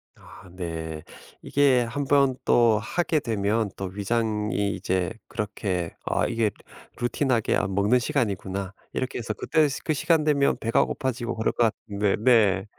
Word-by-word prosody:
아 90 - -15
네. 80 -3 -5 0.4
이게 135 -3 +3
1 120 +5 -3
번 140 -2 +3
또 115 -3 +4
하게 160 +6 0
되면 110 -2 0
또 95 - -5
위장이 105 +1 -1
이제 90 -1 -1 0.2
그렇게 100 -5 -3
'아 - - +1
이게 115 -2 +1 0.5
루틴하게 120 -1 +1
안 95 0 -1
먹는 105 +5 +3
시간이구나.' 100 -8 -2 0.2
이렇게 130 -1 -3
해서 110 -2 -3
그 - - -8
때 155 -2 +4 0.2
그 155 - 0
시간이 155 +1 +2
되면 140 -2 +2
배가 115 +1 +2
고파지고 125 -3 -3
그럴 110 - 0
것 115 -2 +2 0.2
같은데 100 0 +1
네. 105 -6 +4
110 Hz, 280 characters per minute, -25 LUFS, 100-130 Hz, 0.5 s, 또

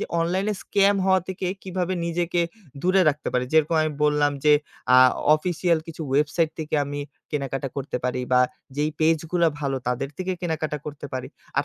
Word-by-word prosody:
যে - - -2
অনলাইনে 190 +5 0
স্কাম 200 0 +3
হওয়া 190 0 +4
থেকে 190 0 -3 0.2
কিভাবে 185 -1 -2
নিজেকে 170 +1 0 0.4
দূরে 185 +2 +4
রাখতে 150 0 -1
পারি 125 0 +1
যেরকম 160 +1 +3
আমি 155 -1 -1
বললাম, 150 -1 +3
যে 150 - +6 0.4
আ - - +8 0.4
অফিসিয়াল 170 +1 0
কিছু 165 0 -6
ওয়েবসাইট 150 +3 +2
থেকে 155 0 -3
আমি 145 +1 -4 0.3
কেনাকাটা 135 -2 -2
করতে 140 -2 -3
পারি 125 0 0
বা 125 - +6 0.4
যেই 150 +1 +1
পেজ 160 +1 +4
গুলা 170 -2 +3
ভালো 140 -2 -1
তাদের 125 +2 -1
থেকে 185 0 -2
কেনাকাটা 160 -3 -2
করতে 145 -1 -6
পারি। 130 -1 -4 0.3
আর - - +2
155 Hz, 175 wpm, -24 LUFS, 145-175 Hz, 0.4 s, আ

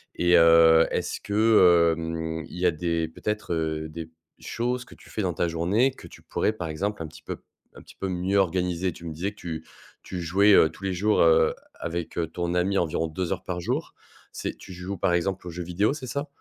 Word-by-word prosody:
Et 90 0 +4
heu, 80 0 +7
est-ce - - -2
que, 95 -6 +5
hem, 80 0 -4
il - - -9
y 90 - 0
a 90 - +5
des 85 0 -1
peut-être, 105 +1 -3
heu, 80 -1 -2
des 80 0 -7 0.3
choses 125 +1 -2
que - - -15
tu - - -18
fais 110 - -3
dans 90 -3 -1
ta 85 - 0
journée 95 +11 +2
que - - -13
tu - - -15
pourrais - - 0
par 90 -6 -5
exemple 95 +4 -3
un 80 - -4
petit - - -14
peu - - -5 0.4
un - - -12
petit - - -16
peu 95 - -3
mieux 90 +2 -1
organiser? 90 -1 +1
Tu 85 - -12
me 80 - -5
disais 90 +6 -2
que - - -22
tu 80 -4 -6 0.4
tu 90 -2 -5
jouais, 100 +5 +4
heu, 80 - +6
tous 90 - -15
les 95 -1 -1
jours, 105 +4 +2
heu, 80 -1 +5 0.3
avec, 85 0 -4
heu, 85 -2 0
ton 85 +1 -3
ami 95 +2 +1
environ 80 -1 0
2 90 +3 -3
heures 95 0 -7
par 90 -1 -3
jour. 125 - -2 0.4
C'est - - -4
tu 95 - -11
joues 90 +2 -6
par 85 - +1
exemple 90 +1 -1
aux - - -4
jeux 90 +1 -5
vidéo, 95 +9 +1
c'est 135 -4 -7
ça? 140 +5 -3
90 Hz, 230 wpm, -26 LUFS, 80-100 Hz, 0.4 s, heu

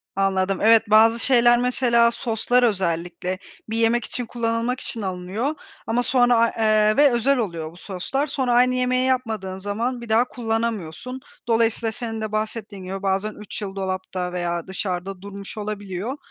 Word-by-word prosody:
Anladım. 195 -1 +1
Evet 225 +1 +6
bazı 225 +2 +6
şeyler, 240 -1 +5
mesela 240 -2 +3
soslar 235 +1 +1
özellikle, 180 -3 -1 0.3
bir 225 - -2
yemek 230 +1 +2
için 245 - -4
kullanılmak 230 +1 -1
için 225 - -5
alınıyor 190 +9 -3 0.3
ama 235 +2 +1
sonra, 245 -1 +4
aaa, 230 0 +5
eee, 215 -1 +3
ve 290 -1 +6
özel 250 +4 +2
oluyor 170 -9 -3
bu 170 - -17
soslar, 205 +11 -3
sonra 260 -5 -1
aynı 250 +1 +4
yemeği 255 0 +1
yapmadığın 220 -7 -1
zaman 225 +6 -3
bir 235 - -9
daha 225 +3 +4
kullanamıyorsun. 225 -2 -3 0.3
Dolayısıyla 225 -1 +1
senin 225 -1 -5
de 215 -1 -3
bahsettiğin 215 -2 -4
gibi 190 +1 -5
bazen 195 +2 0
3 210 +1 -8
yıl 195 -2 -5
dolapta 185 -1 -3
veya 175 -1 -2
dışarıda 190 0 -4
durmuş 200 +1 -9
olabiliyor. 205 +3 -4
220 Hz, 160 wpm, -23 LUFS, 190-240 Hz, 0.3 s, Evet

